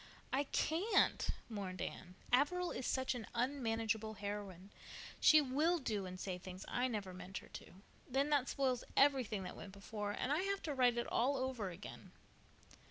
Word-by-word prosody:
"I 280 +2 +2
can't," 340 +10 +2 0.2
mourned 195 -5 -5
Anne. 180 0 -5 0.2
"Averil 350 +7 +3
is 255 - -3
such 260 0 +1
an 240 -4 -6
unmanageable 225 -4 0
heroine. 200 -2 -5 0.5
She 310 -1 +8
will 300 +6 +2
do 215 - -2
and 185 0 -7
say 185 -1 -3
things 185 +1 -8
I 245 +1 +1
never 205 -6 -3
meant 185 +1 -7
her - - -9
to. - - -10 0.4
Then 275 +3 +1
that 280 -3 +3
spoils 260 -3 +1
everything 255 -8 +4
that 180 - -6
went 195 - -9
before 205 +1 -4
and 255 - -2
I 300 - +3
have 395 +1 -1
to 300 - -2
write 250 -3 +4
it 235 - 0
all 270 +4 +2
over 255 -6 -2
again." 180 +3 -10
235 Hz, 170 wpm, -38 LUFS, 200-275 Hz, 0.5 s, She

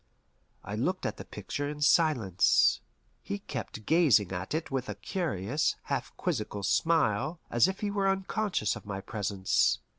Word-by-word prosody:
I - - -7
looked - - -1
at - - -2
the - - -7
picture 145 0 -5
in 150 0 -6
silence. 140 - +4 0.4
He 200 - -4
kept 110 - -7
gazing 145 - +4
at 95 +8 -3
it 160 -2 -3
with 130 -3 -2
a 105 - -3
curious, 130 - -1
half - - -3
quizzical 100 -1 -2
smile, 160 - +1
as 120 +8 +5
if 190 +1 -4
he 205 -1 -1
were 200 -1 +1
unconscious 195 - 0
of - - -10
my 100 -1 -4
presence. 100 -3 +1
135 Hz, 155 wpm, -29 LUFS, 100-170 Hz, 0.4 s, as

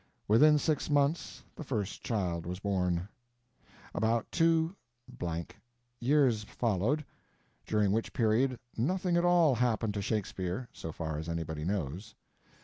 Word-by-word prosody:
Within 150 +8 +6
six 155 +1 0
months 145 +2 +1
the - - -6
first 110 -8 -3
child 90 -7 -1
was 90 +1 -3
born. 90 -3 0 0.9
About 115 +1 +1
two 165 +1 +2 0.3
(blank) 85 -1 -5 0.4
years 125 -4 +3
followed, 115 +7 0 0.6
during 105 -2 +2
which 110 +2 0
period 125 +2 +2 0.2
nothing 180 +8 0
at 175 0 +3
all 175 -5 +5
happened 115 -3 +1
to 100 - -2
Shakespeare, 100 +1 -2
so 80 - -6
far 80 -1 -4
as 80 +1 -5
anybody 80 -2 -3
knows. 95 +2 -3
110 Hz, 130 wpm, -31 LUFS, 90-140 Hz, 0.9 s, Within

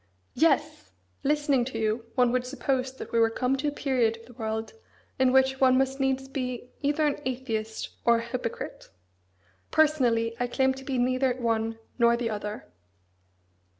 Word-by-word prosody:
"Yes! 280 - +1 0.3
Listening 290 -3 +2
to 255 -2 -5
you, 220 +1 -1
one 245 -1 +4
would 250 0 +1
suppose 260 0 -1
that - - -8
we 230 - +2
were 225 0 +5
come 250 +3 0
to 290 +3 -2
a - - +1
period 250 -6 +1
of 230 - -16
the 245 - -15
world 220 -1 -4 0.5
in 260 -1 +4
which 265 0 +3
one 255 -1 +6
must 270 +1 0
needs 265 0 0
be 255 -2 -4
either 295 +2 +1
an 295 0 0
atheist 230 -4 -3
or 235 0 +5
a - - -2
hypocrite! 235 -1 -5 0.8
Personally, 245 -7 +2
I 245 - 0
claim 265 +2 +2
to 265 0 -10
be 265 -1 -2
neither 255 +1 +2
one 225 -2 -1 0.2
nor 235 0 +5
the 235 -2 -2
other." 210 0 -5
255 Hz, 170 wpm, -27 LUFS, 230-265 Hz, 0.8 s, one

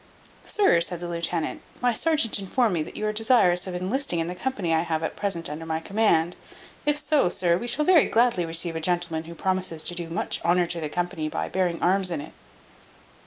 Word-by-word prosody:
"Sir," 395 - +3
said 170 0 0
the 175 - -5
lieutenant, 170 -1 -2 0.2
"my 245 -1 +2
serjeant 300 -4 +2
informed 215 +2 +1
me 165 - 0
that 155 - -7
you 215 - -2
are 215 - 0
desirous 210 -5 +3
of 180 - -5
enlisting 185 +3 -1
in 165 - 0
the 175 - -4
company 185 -4 -2
I 160 - +3
have 165 -1 -2
at - - -3
present 190 -5 -2
under 150 +2 -6
my 160 0 -2
command; 175 -3 +1 0.5
if 295 0 +3
so, 295 - +2
sir, 175 -1 +1
we 235 +7 -4
shall 300 +5 +2
very 350 -4 +6
gladly 230 -6 +2
receive 165 0 -2
a 160 - -3
gentleman 170 -1 -1
who 170 +1 -9
promises 185 -3 -2
to - - +1
do 170 -1 -5
much 165 - -2
honour 175 +1 +3
to 170 0 -3
the 155 - -3
company 175 -1 -3
by - - -3
bearing 180 -3 -1
arms 185 +1 +3
in 170 - -3
it." 145 - -9
175 Hz, 215 wpm, -25 LUFS, 165-215 Hz, 0.5 s, very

